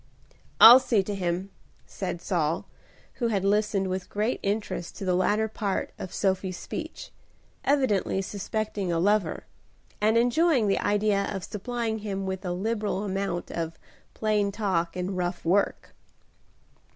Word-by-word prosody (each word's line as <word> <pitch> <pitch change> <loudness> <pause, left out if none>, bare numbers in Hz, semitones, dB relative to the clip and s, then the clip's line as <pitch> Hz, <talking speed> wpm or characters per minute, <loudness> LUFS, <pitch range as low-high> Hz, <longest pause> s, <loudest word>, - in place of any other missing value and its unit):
"I'll 240 +3 +11
see 225 -6 +1
to 205 - -4
him," 185 0 -2 0.3
said - - -5
Saul, - - 0 0.6
who 235 - +3
had 200 -4 0
listened 205 -1 +1
with 185 0 -4
great 215 +4 -1
interest 200 -3 -3
to 195 - -6
the 185 - +2
latter 210 +4 +2
part 205 -2 -2
of 185 - -6
Sophie's 190 -2 -1
speech, - - -7 0.5
evidently 260 -10 +1
suspecting 205 -1 -3
a 170 - +1
lover, 195 -1 +1 0.6
and 215 +2 +3
enjoying 245 +1 +3
the 195 - +2
idea 205 -1 +1
of 195 -3 -4
supplying 225 +1 -3
him 195 -2 -4
with 190 0 -4
a 180 - -2
liberal 210 +1 -1
amount 195 -3 -3
of 165 -1 -4 0.4
"plain 210 -2 +1
talk 190 -5 -1
and 185 +1 -3
rough 175 -1 -3
work." 195 +4 +1
200 Hz, 140 wpm, -27 LUFS, 185-215 Hz, 0.6 s, I'll